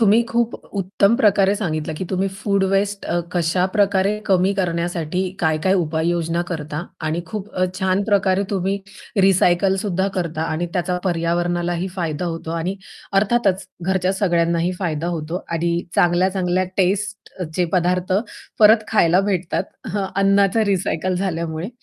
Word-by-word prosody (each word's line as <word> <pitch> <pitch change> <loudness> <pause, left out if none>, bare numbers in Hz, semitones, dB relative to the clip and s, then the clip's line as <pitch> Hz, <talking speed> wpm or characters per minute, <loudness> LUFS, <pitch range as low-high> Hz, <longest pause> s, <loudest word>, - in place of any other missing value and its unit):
तुम्ही 220 +1 +5
खूप 235 0 0 0.2
उत्तम 200 +2 +2
प्रकारे 200 -5 +4
सांगितलं, 160 -6 -2
की 185 - -3
तुम्ही 190 +1 0
फूड 195 0 0
वेस्ट 200 +1 0
अ, 175 - 0
कशा 175 +1 +1
प्रकारे 200 0 +2
कमी 190 0 +3
करण्यासाठी 175 -2 -1 0.2
काय-काय 160 +3 +2
उपाययोजना 165 0 0
करता 155 -2 -4 0.2
आणि 160 +2 -1
खूप 210 +3 -6
अ, 185 - +2
छान 190 +1 +1
प्रकारे 195 -2 +2
तुम्ही 195 0 0 0.4
रिसायकल 190 0 +4
सुद्धा 190 -2 0
करता 165 -3 -2
आणि 165 +3 -1
त्याचा 180 0 -1
पर्यावरणालाही 175 0 0
फायदा 165 -2 -2
होतो 165 -1 -4
आणि 180 +4 -2 0.4
अर्थातच 200 -3 +1 0.2
घरच्या 190 +1 +1
सगळ्यांनाही 170 -2 +1
फायदा 165 -3 -2
होतो 160 +3 -4
आणि 170 0 0 0.2
चांगल्या-चांगल्या 180 +1 +2
टेस्टचे 190 -3 -1
पदार्थ 180 0 +1 0.5
परत 215 0 +6
खायला 180 -4 +4
भेटतात. 190 -4 -1 0.5
अन्नाचं 195 +1 +3
रिसायकल 185 -2 0
झाल्यामुळे. 170 -2 -2
185 Hz, 130 wpm, -21 LUFS, 170-195 Hz, 0.5 s, परत